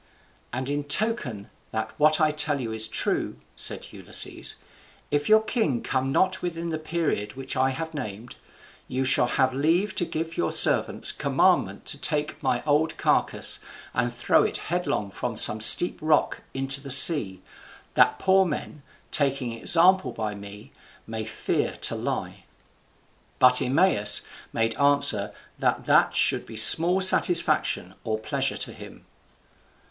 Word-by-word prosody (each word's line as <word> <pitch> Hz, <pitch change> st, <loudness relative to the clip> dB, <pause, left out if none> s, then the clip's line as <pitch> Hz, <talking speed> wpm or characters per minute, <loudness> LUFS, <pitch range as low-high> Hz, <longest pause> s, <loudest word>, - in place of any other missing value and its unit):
"And 130 Hz, +2 st, -5 dB
in 145 Hz, +1 st, -4 dB
token 145 Hz, -, 0 dB, 0.2 s
that 110 Hz, 0 st, -5 dB
what 155 Hz, +2 st, +3 dB
I 155 Hz, -1 st, +2 dB
tell 150 Hz, -1 st, +1 dB
you 115 Hz, -3 st, -5 dB
is 110 Hz, 0 st, +1 dB
true," 110 Hz, -, -2 dB, 0.2 s
said -, -, -5 dB
Ulysses, -, -, -4 dB, 0.6 s
"if 145 Hz, +3 st, -1 dB
your 220 Hz, 0 st, +4 dB
king 215 Hz, -, -2 dB
come 130 Hz, 0 st, -2 dB
not 185 Hz, +6 st, 0 dB
within 170 Hz, -1 st, -5 dB
the 160 Hz, -1 st, -4 dB
period 155 Hz, -10 st, -4 dB
which 135 Hz, 0 st, -6 dB
I 130 Hz, +1 st, +1 dB
have 160 Hz, +5 st, -6 dB
named, 110 Hz, -4 st, -8 dB, 0.5 s
you 130 Hz, +1 st, -3 dB
shall 130 Hz, -2 st, +2 dB
have 130 Hz, 0 st, 0 dB
leave 165 Hz, +9 st, 0 dB
to 175 Hz, -, -1 dB
give 165 Hz, +1 st, -6 dB
your 85 Hz, -, -2 dB
servants -, -, +2 dB
commandment -, -, -1 dB
to -, -, -5 dB
take 150 Hz, +1 st, -2 dB
my 130 Hz, -4 st, -2 dB
old 150 Hz, +2 st, 0 dB
carcass, -, -, -1 dB, 0.3 s
and 120 Hz, 0 st, -1 dB
throw 120 Hz, 0 st, +1 dB
it -, -, -2 dB, 0.2 s
headlong 145 Hz, -, -3 dB
from 120 Hz, +2 st, -6 dB
some 110 Hz, 0 st, +4 dB
steep 175 Hz, +10 st, +6 dB
rock 155 Hz, -1 st, 0 dB
into 135 Hz, +1 st, -1 dB
the 140 Hz, -, -10 dB
sea, 125 Hz, -, +5 dB, 0.5 s
that -, -, +2 dB
poor 190 Hz, 0 st, +2 dB
men, 150 Hz, -3 st, -6 dB, 0.3 s
taking 135 Hz, -4 st, -1 dB
example 165 Hz, +4 st, +3 dB
by 110 Hz, -2 st, -5 dB
me, 100 Hz, 0 st, -12 dB, 0.3 s
may 110 Hz, -1 st, -6 dB
fear 110 Hz, -, -3 dB
to -, -, +3 dB
lie." -, -, -6 dB, 0.9 s
But 125 Hz, 0 st, +4 dB
Eumaeus 135 Hz, -, +5 dB, 0.3 s
made 115 Hz, 0 st, -1 dB
answer 140 Hz, -7 st, +3 dB, 0.3 s
that -, -, -1 dB
that -, -, +2 dB
should -, -, +1 dB
be 110 Hz, -, -9 dB
small 170 Hz, -, +6 dB
satisfaction 185 Hz, -1 st, +1 dB
or 110 Hz, -1 st, -3 dB
pleasure 110 Hz, -, -3 dB
to -, -, -5 dB
him. -, -, -14 dB
140 Hz, 150 wpm, -24 LUFS, 115-160 Hz, 0.9 s, steep